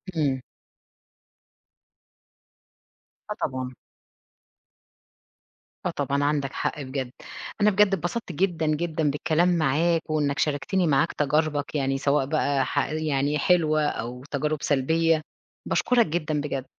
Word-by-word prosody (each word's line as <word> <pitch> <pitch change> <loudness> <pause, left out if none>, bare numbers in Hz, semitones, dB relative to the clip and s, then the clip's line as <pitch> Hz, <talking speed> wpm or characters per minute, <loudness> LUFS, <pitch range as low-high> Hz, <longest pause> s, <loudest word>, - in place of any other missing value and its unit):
إمم. 140 -5 +1 2.9
آه - - -1
طبعًا. 130 -3 -2 2.1
آه - - +2
طبعًا 140 +1 0
عندَك 145 -2 0
حق 150 - -2
بجد، 130 -2 -4 0.5
أنا 210 - +6
بجد 210 +1 +5
اتبسطت 190 +4 -2
جدًا، 170 -1 0
جدًا 155 0 0
بالكلام 170 +4 +2
معاك 160 +3 +2
وإنَّك 150 -2 0
شاركتني 160 +5 +1
معاك 145 +2 +2
تجاربَك 150 0 0
يعني 135 -1 0
سواء 140 0 +1
بقى 140 -2 +1
ح 145 - 0
يعني 150 -2 0
حلوة 155 -3 +3
أو 125 -1 -4
تجارب 150 +2 0
سلبية، 160 +3 +2 0.4
باشكرَك 245 -2 +3
جدًا 155 -2 -1
بجد. 140 -3 -3
150 Hz, 110 wpm, -25 LUFS, 140-165 Hz, 2.9 s, أنا